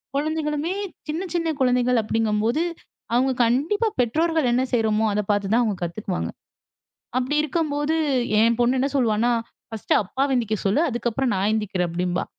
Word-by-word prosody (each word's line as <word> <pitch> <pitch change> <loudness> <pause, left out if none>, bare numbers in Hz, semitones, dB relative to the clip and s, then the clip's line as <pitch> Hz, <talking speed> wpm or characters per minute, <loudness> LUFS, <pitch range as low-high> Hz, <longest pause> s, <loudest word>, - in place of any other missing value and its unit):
குழந்தைகளுமே 305 +2 -1 0.4
சின்ன 345 +5 -2
சின்ன 330 -2 0
குழந்தைகள் 250 -2 +3
அப்டிங்கும்போது, 225 +6 0 0.5
அவங்க 260 +2 +3
கண்டிப்பா 320 - +1
பெற்றோர்கள் 315 +3 +2
என்ன 255 +2 +2
செய்றோமோ 220 -2 +2
அத 210 - +1
பார்த்து 205 -1 0
தான் 240 +1 +4
அவங்க 210 -5 -1
கத்துக்குவாங்க. 180 +2 -3 0.9
அப்டி 260 +4 -1
இருக்கும்போது 305 0 -1 0.5
என் 230 +1 +3
பொண்ணு 250 +2 +3
என்ன 275 - +1
சொல்லுவான்னா, 235 -1 +2 0.4
"பர்ஸ்ட் 220 - -1
அப்பாவ 270 +7 -1
எந்திக்க 220 -3 0
சொல்லு. 205 +10 +2
அதுக்கு 240 -1 -2
அப்புறம் 265 +1 0
நான் 195 +2 +1
ஏந்திரிக்கிறேன்" 195 -5 -1
அப்டிம்பா. 180 +1 -1
245 Hz, 145 wpm, -23 LUFS, 215-295 Hz, 0.9 s, தான்